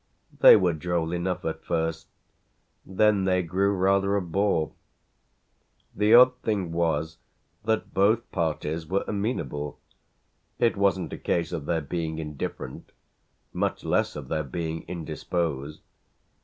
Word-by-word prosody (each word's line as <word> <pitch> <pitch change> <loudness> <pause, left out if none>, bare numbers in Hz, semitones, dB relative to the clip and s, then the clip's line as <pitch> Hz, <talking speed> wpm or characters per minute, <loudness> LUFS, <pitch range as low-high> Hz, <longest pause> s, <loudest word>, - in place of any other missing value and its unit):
They - - +10
were 90 -5 +3
droll 85 +1 -2
enough 90 +1 -2
at 80 0 -3
first; 80 -1 -2 0.8
then 100 0 +2
they 90 -1 +2
grew 95 +4 +1
rather 100 +1 +2
a 100 - +1
bore. 85 -2 0 1.2
The 105 +2 +5
odd 125 +1 +8
thing 100 -6 -1
was 80 -1 -1 0.5
that 110 -1 -1
both 110 +5 +2
parties 80 -1 -2
were 95 +4 0
amenable: 100 - -3 0.8
it 115 - +2
wasn't 100 -2 +1
a - - -6
case 85 -1 -1
of 80 -4 -5
their 85 -2 0
being 80 +2 -3
indifferent, 75 -2 -6 0.6
much - - -1
less - - 0
of - - -7
their 80 -1 -1
being 80 +3 -4
indisposed. 80 -3 -3
85 Hz, 130 wpm, -26 LUFS, 80-100 Hz, 1.2 s, They